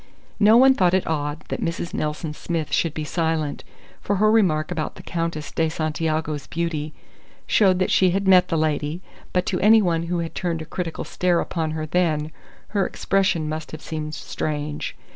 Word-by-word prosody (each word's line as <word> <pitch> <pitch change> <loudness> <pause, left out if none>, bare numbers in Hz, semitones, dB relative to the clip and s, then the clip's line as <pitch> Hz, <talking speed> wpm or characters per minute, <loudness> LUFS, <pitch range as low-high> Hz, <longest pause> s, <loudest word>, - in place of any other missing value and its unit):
No 215 +2 +7
one 265 +2 +7
thought 185 -6 +3
it 190 - +1
odd 150 -1 -2
that - - -3
Mrs. 170 0 -3
Nelson 150 +1 -3
Smith 160 0 -3
should 165 -3 +1
be 155 - -3
silent, 160 -2 -1 0.4
for 205 - 0
her 215 +2 +4
remark 175 -9 +2
about 155 -1 -3
the - - -11
Countess 165 -3 -3
de 160 -1 +1
Santiago's 155 -3 -2
beauty 155 +1 -2 0.5
showed 190 -4 +4
that 185 - 0
she 185 - +4
had 195 +2 0
met 185 -1 +6
the 165 - 0
lady; 155 +2 -1 0.3
but 180 0 +1
to 180 - -1
any 220 +2 +6
one 170 -4 0
who 175 +1 -1
had 165 -1 -3
turned 170 -3 -2
a - - -10
critical 170 0 -4
stare 180 -2 +1
upon 160 -2 -2
her 155 - -2
then, 155 -2 0 0.4
her 200 -2 +1
expression 190 -5 0
must 155 +1 -4
have 155 - -7
seemed 155 -1 -4
strange. 150 0 -4
165 Hz, 185 wpm, -23 LUFS, 155-180 Hz, 0.5 s, No